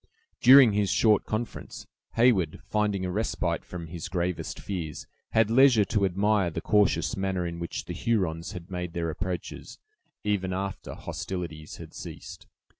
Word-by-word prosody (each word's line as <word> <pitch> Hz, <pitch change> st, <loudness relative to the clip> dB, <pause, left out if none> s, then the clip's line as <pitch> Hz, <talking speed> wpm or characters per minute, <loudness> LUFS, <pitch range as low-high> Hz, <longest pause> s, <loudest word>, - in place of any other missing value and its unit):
During 130 Hz, -3 st, +8 dB
his 100 Hz, -1 st, +1 dB
short 105 Hz, +1 st, +3 dB
conference, 110 Hz, +1 st, -5 dB, 0.3 s
Heyward, 110 Hz, -10 st, +3 dB
finding 105 Hz, -3 st, 0 dB
a 90 Hz, -, -2 dB
respite 110 Hz, +5 st, -1 dB
from 85 Hz, -2 st, -7 dB
his 85 Hz, 0 st, -7 dB
gravest 90 Hz, -1 st, -2 dB
fears, 85 Hz, -6 st, -5 dB, 0.3 s
had 110 Hz, -1 st, +3 dB
leisure 125 Hz, -4 st, +6 dB
to 100 Hz, +1 st, +1 dB
admire 100 Hz, 0 st, +2 dB
the 80 Hz, -, -4 dB
cautious 90 Hz, -6 st, +2 dB
manner 95 Hz, -2 st, -1 dB
in 85 Hz, 0 st, -5 dB
which 85 Hz, -, -5 dB
the -, -, -5 dB
Hurons 95 Hz, -5 st, -1 dB
had 90 Hz, 0 st, -9 dB
made 90 Hz, -2 st, -4 dB
their 85 Hz, -1 st, -2 dB
approaches, 90 Hz, +2 st, -5 dB, 0.5 s
even 95 Hz, -3 st, 0 dB
after 95 Hz, 0 st, -4 dB
hostilities 85 Hz, -4 st, -6 dB
had -, -, -11 dB
ceased. -, -, -9 dB
95 Hz, 150 wpm, -27 LUFS, 85-105 Hz, 0.5 s, During